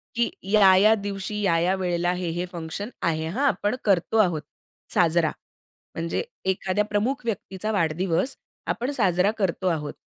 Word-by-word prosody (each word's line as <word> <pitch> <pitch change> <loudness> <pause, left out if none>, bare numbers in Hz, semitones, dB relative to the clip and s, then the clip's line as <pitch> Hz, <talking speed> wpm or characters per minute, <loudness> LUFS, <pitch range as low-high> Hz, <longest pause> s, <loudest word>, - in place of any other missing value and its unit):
की 235 0 +2 0.2
या-या 205 0 +6
दिवशी, 200 0 -4
या-या 175 -1 +2
वेळेला, 175 -2 0
हे-हे 175 -1 -2
फंक्शन 170 +4 -5
आहे 160 -1 0
हां, 255 - 0
आपण 210 -3 0
करतो 195 +1 +2
आहोत 175 -6 +1 0.5
साजरा. 165 -2 +3 0.6
म्हणजे 165 - -2 0.3
एखाद्या 190 +2 -1
प्रमुख 215 +7 -1
व्यक्तीचा 215 -1 -3
वाढदिवस 175 - 0 0.3
आपण 245 +4 -1
साजरा 195 -6 +2
करतो 190 -2 -1
आहोत. 155 -4 -1
190 Hz, 130 wpm, -25 LUFS, 170-210 Hz, 0.6 s, या-या